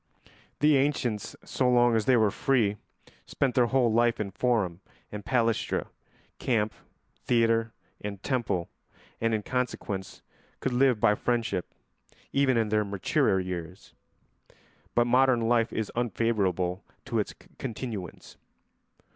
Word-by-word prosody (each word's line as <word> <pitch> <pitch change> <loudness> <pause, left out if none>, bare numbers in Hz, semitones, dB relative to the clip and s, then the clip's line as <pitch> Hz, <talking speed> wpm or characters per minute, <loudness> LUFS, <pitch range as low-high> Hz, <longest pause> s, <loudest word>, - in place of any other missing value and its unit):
The 150 -1 +5
ancients, 130 -6 -1
so 125 - +1
long 120 -1 +4
as 110 -2 +1
they 130 -2 +5
were 110 -3 +3
free, 110 -6 +1 0.5
spent 135 -3 0
their 120 -1 +3
whole 125 -3 +2
life 120 0 +3
in 100 -2 -3
forum 100 -6 0 0.3
and 105 -1 -6
palæstra, 115 -2 0 0.5
camp, 110 -4 0 0.5
theatre, 115 -1 +2 0.3
and 100 -1 -4
temple, 120 -10 -1 0.5
and 115 0 +2
in 110 -2 0
consequence 115 -6 -3 0.4
could 130 - -2
live 125 -2 +3
by 105 -1 +4
friendship 115 -5 -1 0.6
even 135 -3 +3
in 110 -2 +1
their 105 0 +2
maturer 100 -1 +1
years; 90 0 -6 1.0
but 120 - +4
modern 125 0 +4
life 115 0 +2
is 110 -2 -3
unfavourable 100 -6 0 0.2
to 120 -4 -1
its 105 - -2 0.3
continuance. 110 -5 -6
115 Hz, 125 wpm, -28 LUFS, 105-125 Hz, 1.0 s, The